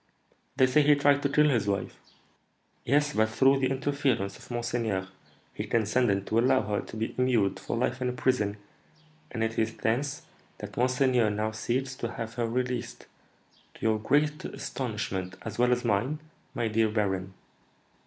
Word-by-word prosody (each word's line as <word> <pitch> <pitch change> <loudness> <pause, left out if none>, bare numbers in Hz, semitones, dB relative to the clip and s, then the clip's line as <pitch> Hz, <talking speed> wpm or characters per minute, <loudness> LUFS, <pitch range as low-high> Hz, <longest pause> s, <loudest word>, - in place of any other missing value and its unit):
"They 130 -1 +5
say 130 +4 +4
he 145 0 +5
tried 145 0 +3
to 140 - +1
kill 150 +2 +4
his 115 -7 +1
wife." 100 -1 -1 0.9
"Yes; 145 +1 +2
but, 110 0 +2
through 135 +5 +4
the 130 -1 +1
interference 135 -6 0
of - - -15
monseigneur, 115 -5 -2 0.5
he - - -4
consented 110 -3 +1
to 110 - +1
allow 130 +2 +3
her 105 -1 -1
to 110 - -9
be 110 +1 -2
immured 115 -7 +2
for - - -3
life 125 +2 -1
in 125 - +1
a - - -3
prison, 115 -5 0 0.7
and 115 -2 -2
it 115 0 -1
is 110 0 -1
thence 135 +6 -1 0.3
that - - -8
monseigneur 125 -2 +2
now 105 +1 -1
seeks 130 +4 -2
to - - -4
have 115 -2 -5
her 120 -1 -1
released, 125 0 -3 0.7
to - - -16
your 110 -1 +2
great 150 +6 +1
astonishment, 100 -7 -4
as 110 0 -6
well 125 0 +4
as 125 0 +1
mine, 120 +7 +1 0.4
my 115 - 0
dear 110 0 +2
baron. 95 -3 -1
120 Hz, 170 wpm, -28 LUFS, 110-130 Hz, 0.9 s, They